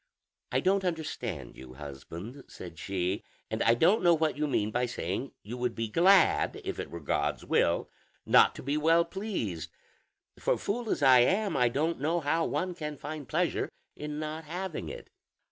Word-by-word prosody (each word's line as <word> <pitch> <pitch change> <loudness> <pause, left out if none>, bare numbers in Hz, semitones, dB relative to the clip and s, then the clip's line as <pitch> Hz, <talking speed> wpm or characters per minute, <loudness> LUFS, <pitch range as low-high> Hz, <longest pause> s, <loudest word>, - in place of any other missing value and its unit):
"I - - +2
don't 195 +1 +2
understand 125 - -4
you, 65 0 -11
husband," 80 - -9
said 85 -3 -10
she, 95 0 -2 0.3
"and - - -1
I 115 - +5
don't 175 - +4
know 175 -1 +5
what 160 -1 0
you 150 +1 -1
mean 110 -6 0
by 125 +2 0
saying 120 +2 -3
you 115 +5 -6
would 125 -1 -1
be 115 -1 -2
glad, 185 - +4
if - - -4
it - - -4
were 85 - -7
God's 75 - -1
will, - - +2 0.4
not - - +6
to - - -8
be 140 +3 0
well 165 +2 +4
pleased; 170 - -4 0.7
for - - +1
fool 225 +2 -3
as - - 0
I 130 -2 +8
am, 195 - +2
I 125 -1 +4
don't 155 +7 0
know 165 +4 +1
how 165 +2 +1
one 185 0 -1
can 150 -3 -5
find 150 -1 -6
pleasure - - 0 0.3
in 150 0 -5
not 155 +1 -4
having 180 +2 -4
it." - - -9
150 Hz, 180 wpm, -30 LUFS, 110-170 Hz, 0.7 s, I